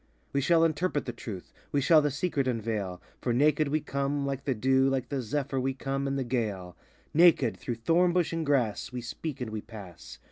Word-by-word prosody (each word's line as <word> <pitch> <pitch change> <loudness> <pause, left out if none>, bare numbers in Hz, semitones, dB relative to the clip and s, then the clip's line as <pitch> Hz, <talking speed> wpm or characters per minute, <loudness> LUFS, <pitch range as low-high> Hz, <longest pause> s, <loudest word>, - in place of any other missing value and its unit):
We 140 - +2
shall 165 +3 +4
interpret 160 -1 0
the 120 - -4
Truth, 105 -6 -8 0.2
We 145 - +2
shall 155 +3 +5
the 150 - +1
Secret 145 -2 -1
unveil; 110 -6 -2 0.2
For 120 - 0
naked 150 +4 +3
we 150 +2 0
come, 140 0 -1
like 135 -1 -3
the 135 - 0
dew, 130 +4 +3
Like 130 -2 -1
the 140 -2 -1
zephyr, 135 +3 -2
we 130 +1 -1
come, 135 +1 -2
and 140 0 -1
the 135 - 0
gale: 105 -8 -3 0.4
Naked, 155 -8 +5
through 120 - -4
thorn 165 +10 +3
bush 175 -2 +1
and 165 -1 -1
grass, 130 -9 0
We 125 -1 -4
speak 130 +3 -5
add 115 - -5
we 110 -1 -4
pass. 100 -6 -11
135 Hz, 210 wpm, -29 LUFS, 120-145 Hz, 0.4 s, shall